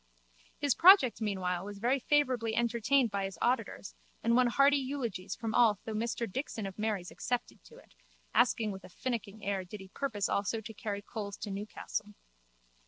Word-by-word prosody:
His 285 -3 +2
project 330 - +7
meanwhile 185 -4 -1
was 205 0 -7
very 245 +6 +1
favourably 255 -5 +1
entertained 235 +1 +2
by 200 -1 -1
his 195 - -6
auditors 250 +2 -1 0.3
and 230 0 +3
won 250 0 +5
hearty 275 +4 +4
eulogies 235 -9 -3
from 225 -1 -4
all 230 -4 +5
though 220 - -4
Mr 230 +2 -1
Dixon 225 -1 -4
of 195 +1 -7
Mary's 210 -5 -2
excepted 245 -1 -3
to 470 - -15
it, - - -19 0.4
asking 230 -3 +3
with 190 0 -8
a - - -11
finicking 220 -1 -4
air 195 -1 -1
did 195 +3 -9
he 190 0 -11
purpose 210 -4 -2
also 200 +3 0
to 220 +1 -9
carry 205 -1 -4
coals 205 -2 -6
to 205 - -5
Newcastle. 205 +1 -5
220 Hz, 175 wpm, -32 LUFS, 200-245 Hz, 0.4 s, project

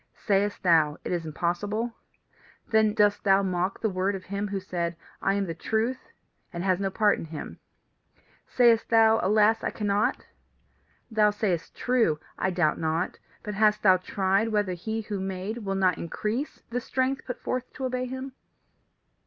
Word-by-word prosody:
Sayest 205 0 0
thou, 160 -4 +4
It - - -4
is 170 -2 -2
impossible? 205 +9 -2 0.8
Then 220 -1 +3
dost 205 -1 +3
thou 195 0 +4
mock 185 0 -1
the 220 - +1
word 190 +2 0
of 190 - -7
him 200 +2 -3
who 200 -1 -3
said, 175 -2 -3 0.3
I 195 - +2
am 200 -1 0
the 165 - -4
Truth, 220 +9 -2 0.4
and 170 -2 -4
has 185 -1 +2
no 195 -1 0
part 210 +1 +2
in - - -6
him. 155 -2 -8 0.9
Sayest 235 -2 +4
thou, 225 -1 +5
Alas, 215 +2 +3
I - - 0
cannot? 205 0 0 0.9
Thou 215 -1 +4
sayest 205 -5 -2
true, 230 -12 +1 0.2
I 190 - +1
doubt 175 -4 +1
not. 160 +2 -1 0.2
But 210 - -4
hast 210 +1 +2
thou 185 -2 +6
tried 195 +3 0
whether 205 -4 0
he 220 +6 -3
who 205 -2 -4
made 190 +4 -4
will 195 -3 -3
not 185 -2 +2
increase 215 - -3
the 245 +1 -1
strength 260 +2 -1
put 250 - -5
forth 255 0 -3
to 265 - -4
obey 255 0 -1
him? 260 +1 -6
205 Hz, 170 wpm, -27 LUFS, 185-220 Hz, 0.9 s, thou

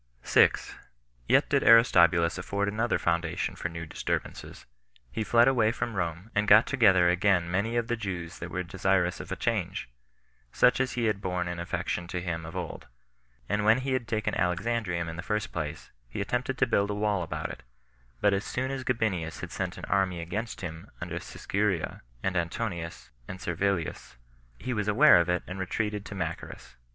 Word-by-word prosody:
6. - - +3 0.5
Yet - - +4
did - - +2
Aristobulus 85 -7 +5
afford 100 +2 -1
another 110 +3 0
foundation 85 0 -1
for 90 - -4
new 85 0 -6
disturbances. - - -4 0.5
He 110 - -2
fled 115 +3 +5
away 115 -5 +3
from 115 0 -3
Rome, 90 +2 -3
and 105 0 +1
got 105 +2 +8
together 95 -9 +4
again 90 -1 +2
many 105 +6 0
of 120 - +1
the 120 - 0
Jews 90 -6 -5
that 85 - -6
were 90 +1 -3
desirous 90 0 0
of - - -8
a - - -1
change, - - -2 0.6
such 125 - +4
as 130 -1 0
had 110 -5 0
borne 90 -2 -2
an 85 -1 -4
affection 85 0 -3
to 90 0 -3
him 85 -2 -4
of 80 - -9
old; - - -5 0.6
and 105 +1 0
when 110 +2 +5
he 135 0 -1
had 125 -3 -1
taken 110 -2 -1
Alexandrium 90 -1 -1
in 80 0 -6
the - - -3
first 105 +3 -2
place, 80 -1 -5 0.2
he - - -6
attempted 125 +5 -1
to - - +4
build 100 0 +1
a 105 - -1
wall 105 -2 0
about 85 - -4
it; - - -10 0.6
but 105 -1 +4
as 100 +1 0
soon 130 +2 -2
as 135 -1 -4
Gabinius 105 -10 -1
had - - -6
sent - - -3
an - - -6
army 95 -2 +1
against 105 +7 -4
him 85 +1 -7
under 85 0 -4
Siscuria, 100 -1 -2 0.2
and 95 -1 -1
Antonius, 85 - -3 0.2
and 95 - -7
Servilius, 85 -1 -2 0.4
he 125 - -3
was 105 -2 -1
aware 130 +9 +7
of 85 - -2
it, 90 0 +1
and 90 +1 -7
retreated 105 +2 -2
to 100 - -7
Machaerus. 85 -3 -6
95 Hz, 185 wpm, -28 LUFS, 85-110 Hz, 0.6 s, got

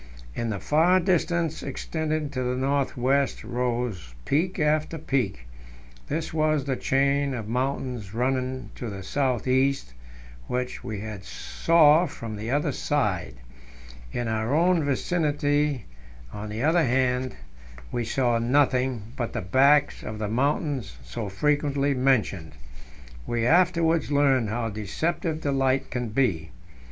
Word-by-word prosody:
In 115 - -2
the 100 -3 -2
far 170 - +3
distance, 170 -3 0
extending 155 +2 -3
to 130 -3 -3
the 125 0 -1
north 135 +1 0
west, 135 +2 +1
rose 120 - -3
peak 170 +6 0
after 155 0 +1
peak; 125 - -2 0.6
this 160 +2 -3
was 155 -3 +1
the 135 -2 0
chain 140 +1 +1
of 110 -3 -5
mountains 125 -3 -2
running 130 +2 -2
to 120 - -4
the 100 -2 -7
south 130 +3 -1
east, 130 - +1 0.5
which 125 0 -3
we 110 - -4
now 105 -2 -6
saw 155 - +3
from 115 -6 -7
the 110 +2 -5
other 145 +3 +1
side. 105 - -1 0.8
In 120 -1 -2
our 110 +4 0
own 170 0 +3
vicinity, 145 - 0 0.5
on 105 +1 -6
the 110 +4 -3
other 165 +3 +4
band, 125 -1 +1 0.6
we 120 - -1
saw 120 0 +1
nothing 125 -2 +1
but 120 -3 -3
the - - -2
backs 140 +9 +3
of 110 - -6
the 105 -1 -2
mountains 135 - -1
so - - -5
frequently 145 +5 +1
mentioned. 120 - +1 0.7
We 115 -1 0
afterwards 165 0 +3
learned 135 -5 +3
how 115 +1 -2
deceptive 155 - -2
the 145 - -1
light 135 0 +1
can 125 -2 -2
be. 105 -10 0
130 Hz, 135 wpm, -26 LUFS, 115-150 Hz, 0.8 s, other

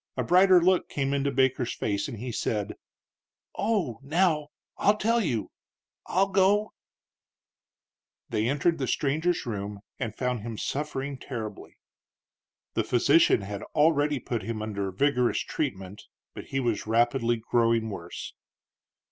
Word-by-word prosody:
A - - +1
brighter 185 0 +6
look 185 +1 +2
came 140 -1 -1
into 140 0 +1
Baker's 130 -2 +1
face 100 -1 -1
and 120 - -7
he 125 +3 -5
said: 105 -2 -2 0.8
"Oh, 195 - -1
now, 155 +1 +1 0.3
I'll 205 +1 +3
tell 230 +2 +2
you; 120 - -2 0.6
I'll 195 +2 +2
go." 200 +2 +3 1.5
They 110 +2 0
entered 150 +4 +1
the 130 - -1
stranger's 155 +7 0
room 100 -3 -5 0.2
and 110 -1 -4
found 125 -2 -1
him 115 0 -6
suffering 140 0 -3
terribly. 115 -6 -7 1.0
The - - +1
physician 125 -2 +4 0.3
already 150 -1 +3
had 130 - -7
put 120 -3 -2
him 110 -2 -4
under 100 -2 -3
vigorous 125 +4 +1
treatment, 100 -9 -4 0.3
but - - -8
he 135 - -2
was 120 -5 -1
rapidly 120 +1 +2
growing 115 -1 +1
worse. 85 -3 -7
130 Hz, 130 wpm, -27 LUFS, 115-155 Hz, 1.5 s, brighter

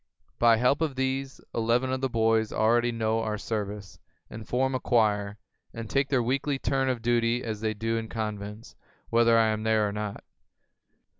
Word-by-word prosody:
By 115 -1 +5
help 125 +6 +2
of 155 -4 0
these, 130 +1 -2
eleven 120 +3 +1
of 130 - -2
the 135 - 0
boys 110 -1 +1
already 120 +2 +2
know 110 -1 0
our 110 -1 -2
service, 105 -2 -5 0.3
and 110 0 -8
form 130 +2 0
a 130 - 0
choir, 105 -4 +1 0.4
and 115 -1 -6
take 135 +4 0
their 130 -4 +2
weekly 135 +3 0
turn 135 0 0
of 120 -3 -2
duty 120 0 +1
as 110 -2 -4
they 110 -1 -1
do 115 +2 -1
in 115 0 -4
convents, 105 -1 -5 0.4
whether 115 0 +4
I 110 -1 +4
am 110 0 -1
there 110 -1 +2
or - - -3
not. 105 0 -5
115 Hz, 180 wpm, -27 LUFS, 110-125 Hz, 0.4 s, By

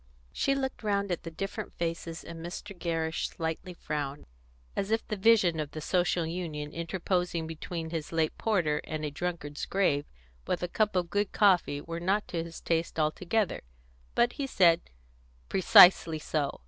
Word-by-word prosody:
She 275 - +1
looked 265 -1 -3
round 200 -2 0
at 175 - -1
the 165 - -6
different 195 +6 -5
faces, 165 -1 -4
and 165 -1 -8
Mr. 190 +3 -7
Gerrish 165 -2 -1
slightly 165 +3 -4
frowned, 145 -3 -4 0.5
as 195 - -1
if 225 +1 0
the 215 - -2
vision 195 -5 +4
of 150 -2 -2
the 155 - -5
Social 175 +1 +1
Union 160 -3 -4
interposing 170 0 -1
between 160 0 -5
his 160 -3 -4
late 160 -2 0
porter 170 -9 +1
and 155 -1 -4
a 150 - -3
drunkard's 155 -2 -4
grave, 150 -7 +1 0.4
with - - -1
a - - 0
cup 210 +3 0
of 175 -2 0
good 205 0 0
coffee, 180 -8 +3
were 165 +2 -5
not 195 +4 0
to 165 -2 -2
his 165 0 -9
taste 165 -1 -1
altogether; 180 +7 0 0.5
but 240 0 +3
he 280 - -3
said: 170 -8 +4 0.7
"Precisely 175 -3 +7
so! 150 -2 -2
170 Hz, 165 wpm, -29 LUFS, 160-195 Hz, 0.7 s, Precisely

